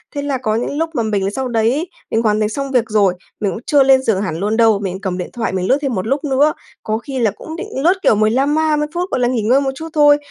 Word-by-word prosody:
Thế 285 - -2
là 285 -2 -1
có 215 -4 -1
những 245 +5 -2
lúc 325 +1 0
mà 235 - +1
mình 200 -3 -1
sau 265 +4 -3
đấy 225 -1 +1
ấy 305 +5 -2 0.3
mình 225 - +2
hoàn 215 -2 +1
thành 210 -1 +1
xong 275 +4 -4
việc 240 -3 +1
rồi, 205 -4 +3 0.3
mình 205 -3 0
cũng 180 - -5
chưa 285 -2 +4
lên 265 -1 +5
giường 210 -6 +1
hẳn 160 -6 -3
luôn 210 +3 -1
đâu, 225 -3 +4
mình 190 -1 -4
cầm 190 -3 -3
điện 180 - -5
thoại 235 -2 -2
mình 185 -1 -1
lướt 265 - +3
thêm 275 -4 -1
một 185 +2 -3
lúc 275 +5 -1
nữa. 290 +1 +2 0.3
Cố 215 0 -1
khi 265 +2 -5
là 225 -4 +2
cũng 315 +10 -9
định 375 +5 -6 0.2
lướt, 345 +3 +5
kiểu, - - +4
15 250 +8 +2
ma 315 -1 +2
mươi 300 0 -1
phút, 355 +2 -2
gọi - - 0
là, 245 - +2
nghỉ 245 -2 0
ngơi 245 +6 +3
một 270 -1 -1
chút 320 +3 -7
thôi. 290 -1 +5
240 Hz, 305 wpm, -17 LUFS, 215-285 Hz, 0.3 s, lên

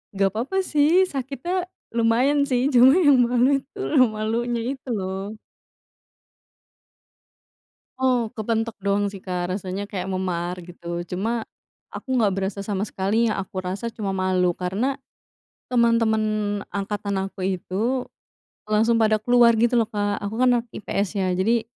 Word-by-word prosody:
Gapapa 215 - 0
sih 315 +6 +4
sakitnya 275 +4 -4 0.4
lumayan 245 +5 +3
sih, 260 -2 +1
cuma 250 +1 +8 0.2
yang 280 -2 +7
malu 245 +2 +3 0.2
tuh 315 -10 +3
malunya 230 +2 -1 0.2
itu 265 - -26
loh. 190 +1 -4 2.7
Oh, 250 -4 +1
kepentok 225 0 -2
doang 200 0 0
sih, 195 - -9
Kak, 180 -1 -3
rasanya 190 +1 -4
kayak 190 -3 -4
memar 180 -2 -2
gitu 170 0 -6
cuma 220 +7 -2 0.5
aku 260 -1 -4
nggak 220 -5 +3
berasa 195 +1 -2
sama 200 0 -2
sekali, 205 +5 0
yang 215 - 0
aku 190 -1 -4
rasa 190 +5 -4
cuma 200 -3 -3
malu 185 -2 +1
karena 200 +10 -1 0.7
teman-teman 230 -2 +3 0.5
angkatan 200 0 -2
aku 190 -1 -7
itu 200 +7 -1 0.6
langsung 220 +2 +2
pada 215 -1 +3
keluar 240 0 +5
gitu 235 +2 +3
loh, 225 - +2
Kak. 205 -2 -2
Aku 200 +2 -4
kan 255 - +5
anak 235 - -6
IPS 200 -1 -2
ya 190 - +1
jadi, 225 +4 +2
215 Hz, 135 wpm, -23 LUFS, 190-240 Hz, 2.7 s, cuma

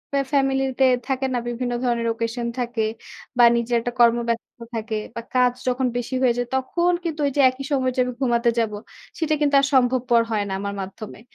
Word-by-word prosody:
আ - - +3
family 270 -1 +2 0.2
তে 265 - +6 0.2
থাকে 265 0 -1
না? 245 - +1
বিভিন্ন 245 0 -2
ধরনের 235 -2 0
occasion 230 +1 -3
থাকে। 240 -2 -2 0.6
বা 240 - +6
নিজের 235 0 0
একটা 245 - -3
কর্ম 235 0 +6
ব্যস্ত 230 +1 -4 0.2
থাকে 220 0 -3 0.2
বা 230 - -4
কাজ 250 -1 +3
যখন 255 0 +1
বেশি 245 +2 -3
হয়ে 250 -2 +4
যায় 245 0 -1
তখন 340 +7 +1
কিন্তু 320 -2 -4
ওই 280 - +1
যে, 285 - +4
একই 260 +2 -7
সময়ে 260 -2 +1
যে, - - -2
আমি 250 - -4
ঘুমাতে 235 -2 +2
যাব। 225 -2 0 0.5
সেটা 315 -2 +1
কিন্তু 285 -1 +3
আর - - +2
সম্ভবপর 245 -2 +3
হয় 210 -2 +1
না 190 - -3
আমার 200 0 -4
মাধ্যমে। 195 +2 -8
245 Hz, 205 wpm, -23 LUFS, 235-265 Hz, 0.6 s, তে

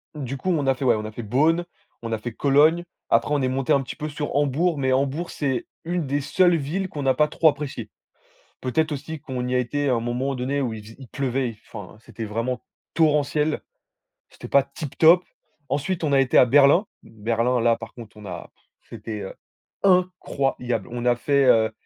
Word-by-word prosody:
Du 135 -2 -5
coup 185 - -3
on 150 -6 +1
a 135 - +3
fait, 130 +1 -4
ouais, 120 - +4
on 110 0 -4
a 110 - -6
fait 115 +2 -7
Bonn, 155 +10 +2 0.4
on 115 - -5
a 110 - 0
fait 120 +2 -6
Cologne, 150 +7 +3 0.3
après - - +2
on 145 - +1
est 130 - +1
monté 130 0 0
un 140 - +3
petit 125 - -7
peu 155 0 -5
sur 145 -1 -4
Hambourg, 145 +4 +1
mais 130 -1 +1
Hambourg 140 +6 -1
c'est 135 -4 -2 0.2
une 170 -3 -2
des 145 +1 0
seules 175 +5 +3
villes 165 +6 -2
qu'on 145 -4 -5
n'a 130 -1 +3
pas 150 0 +3
trop 160 +1 +4
apprécié. 140 -7 -5 0.7
Peut-être 155 +5 0
aussi 150 +2 -6
qu'on 125 -4 -4
y 125 - -1
a - - +3
été 140 +3 -1
à 125 - +3
un 115 - 0
moment 125 +4 -2
donné 135 +3 -2
où 125 -4 -1
il 105 - -8
faisait 110 +2 -14
il 130 - -12
pleuvait, 130 -4 -2
enfin 100 -1 -10
c'était 115 0 -8
vraiment 115 +4 -3 0.3
torrentiel, 150 -1 +2 0.7
c'était - - -11
pas 140 -1 +4
tip 140 +1 -8
top. 170 +3 +6 0.5
Ensuite 160 +6 -2
on 145 -2 +1
a 135 - +5
été 130 - +2
à - - +8
Berlin, 145 - +5 0.2
Berlin 115 +3 -1
là 115 0 +3
par 115 - -10
contre 115 -4 -12
on 105 - -11
a 90 -3 -8 0.4
c'était, 105 -2 -6
heu, 95 - -7 0.5
incroyable. 180 -11 0
On 120 0 -4
a 120 0 +4
fait, 140 +2 +2
heu 110 -3 +4
135 Hz, 210 wpm, -23 LUFS, 120-150 Hz, 0.7 s, à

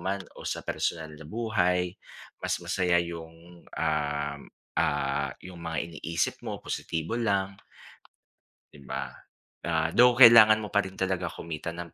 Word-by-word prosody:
man, 95 +2 -2 0.2
o - - -10
sa - - -3
personal 80 -2 -2
na 75 - -12
buhay, 90 -3 0 0.5
mas - - 0
masaya 90 -2 +2
yung, 85 +1 -10
um, 75 -2 -2 0.4
ah, 70 0 0
yung 90 -2 -10
mga 80 -2 -3
iniisip 85 0 -2
mo, - - -5
positibo 80 +7 -3
lang. 100 -4 0 1.2
'Di 70 - -14
ba? - - -3 0.6
Ah, 80 0 0
though 125 0 +6
kailangan 115 -4 +9
mo 105 -1 -7
pa 100 - +4
rin 95 0 -9
talaga 95 -1 -1
kumita 85 0 -6
ng 85 0 -8
85 Hz, 140 wpm, -28 LUFS, 80-95 Hz, 1.2 s, kailangan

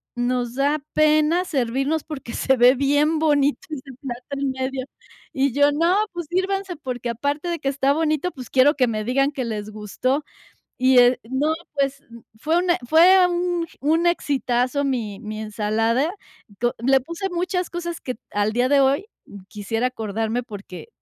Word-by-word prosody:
nos 245 0 -1
da 285 +3 +1
pena 310 +3 +3
servirnos 275 +1 -1
porque 275 -6 -8
se 265 -1 +1
ve 245 +2 +7
bien 290 +4 +2
bonito 290 -2 +2
ese 275 -3 -7
plato 250 -3 -6
en 280 -1 -1
medio”. 260 0 -3 0.5
Y 270 -2 0
yo: 285 0 +4
“No, 335 +5 +2 0.2
pues, 345 -1 -5
sírvanse, 380 0 -1
porque 250 -5 -5
aparte 285 +8 -2
de 340 - -2
que 275 - -1
está 275 0 +1
bonito, 310 +2 0
pues, 255 -6 -10
quiero 270 +3 +5
que 255 -3 +2
me 215 -2 -2
digan 275 +3 +1
que 265 -3 -4
les 215 -2 -4
gustó”. 215 +7 -2 0.5
Y, 255 0 +4
eh, 245 +1 +5
no, 285 +5 +1 0.2
pues, 275 -1 -1 0.4
fue 315 +7 +1
una 355 -1 +2
fue 360 +3 +7
un 350 -1 -1
un 325 +5 +2
exitazo 275 -4 0
mi 225 -7 -2
mi 215 -1 -6
ensalada. 225 +6 0 0.4
Do 235 +4 -2
le 265 +3 +3
puse 335 +8 -5
muchas 360 0 -2
cosas 345 -1 -5
que, 255 - -4 0.2
al 205 +1 0
día 245 +3 +1
de 285 - +4
hoy, 275 +9 +2 0.4
quisiera 225 +4 -2
acordarme, 225 0 -2
porque 200 - -10
275 Hz, 165 wpm, -22 LUFS, 245-315 Hz, 0.5 s, ve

